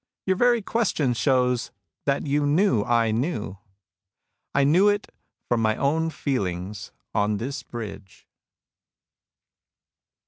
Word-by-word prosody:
Your 190 - +2
very 240 +1 +3
question 190 - 0
shows 125 -1 +1 0.4
that 140 +1 0
you 145 +1 +1
knew 145 - +3
I 115 -1 +2
knew.^ 110 - -2 1.0
I 140 - +4
knew 175 +9 +5
it 205 0 -1 0.4
from 120 -2 +1
my 110 -1 +2
own 160 +4 +1
feeliigs 100 - -3 0.2
on 105 0 +1
this 130 +7 -4
bridge." 105 -4 -9
130 Hz, 110 wpm, -25 LUFS, 110-160 Hz, 1.0 s, knew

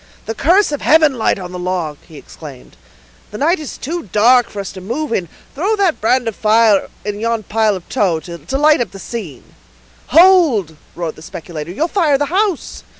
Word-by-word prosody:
"The 225 - -3
curse 350 - +3
of 290 - -3
heaven 310 -2 +4
light - - +1
on 180 -2 -8
the 180 - -6
log!" 175 -5 -3
he 155 - -13
exclaimed. 140 -3 -12 0.5
"The 210 - -8
night 330 - +1
is 305 - -7
too 330 - -5
dark 240 +3 +4
for 205 - -8
us 195 - -5
to 190 - -10
move 240 +8 -3
in; 175 -6 -2 0.2
throw 385 +10 0
that 390 -6 0
brand 245 +2 +1
of 225 - -3
fire 215 -2 +3 0.2
in 205 0 -4
yon 230 0 -1
pile 215 0 +1
of 185 - -9
tow, 190 -10 0
to 170 - -6
light 300 -1 +4
up 240 - -2
the - - -9
scene." 190 - -8 0.5
"Hold!" 310 - +4 0.2
roared 170 -2 -5
the - - -13
speculator; 160 -1 -8
"you'll 295 - -1
fire 325 -6 +2
the 290 - 0
house." 395 -4 -1
225 Hz, 200 wpm, -17 LUFS, 180-300 Hz, 0.5 s, heaven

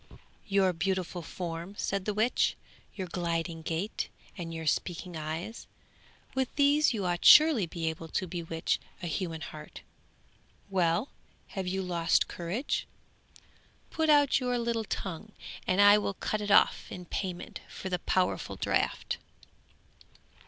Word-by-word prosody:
'Your 195 -2 +3
beautiful 180 +1 -1
form,' 170 +2 -6
said 195 -1 -1
the 210 - 0
witch, 220 +4 +2 0.4
'your 190 - -3
gliding 170 -1 -2
gait, 165 +6 -2 0.3
and 170 -3 -6
your 160 -1 -5
speaking 175 +3 -1
eyes; 160 +8 -5 0.7
with 265 -1 0
these 290 +1 +4
you 210 -6 -2
ought 175 -1 -1
surely 300 - +8
to - - -21
be 165 -2 -3
able 160 0 -3
to 185 - -1
bewitch 165 -2 -2 0.2
a - - -2
human 165 -1 -3
heart. 150 -1 -9 0.9
Well! 180 - +2 0.4
have 190 -2 -4
you 190 +1 -1
lost 170 -2 +2
courage? 185 +11 -2 1.0
Put 320 -1 0
out 290 -2 +5
your 250 -1 0
little 230 -1 -1
tongue, 200 +2 -5 0.3
and 185 +1 +2
I 205 +1 +8
will 200 -1 -2
cut 215 +3 -2
it 205 - -3
off 200 - +4
in 180 -1 -7
payment 180 0 -4
for 190 - -6
the 180 -1 -1
powerful 185 +1 0
draught.' - - -1
185 Hz, 140 wpm, -30 LUFS, 170-210 Hz, 1.0 s, surely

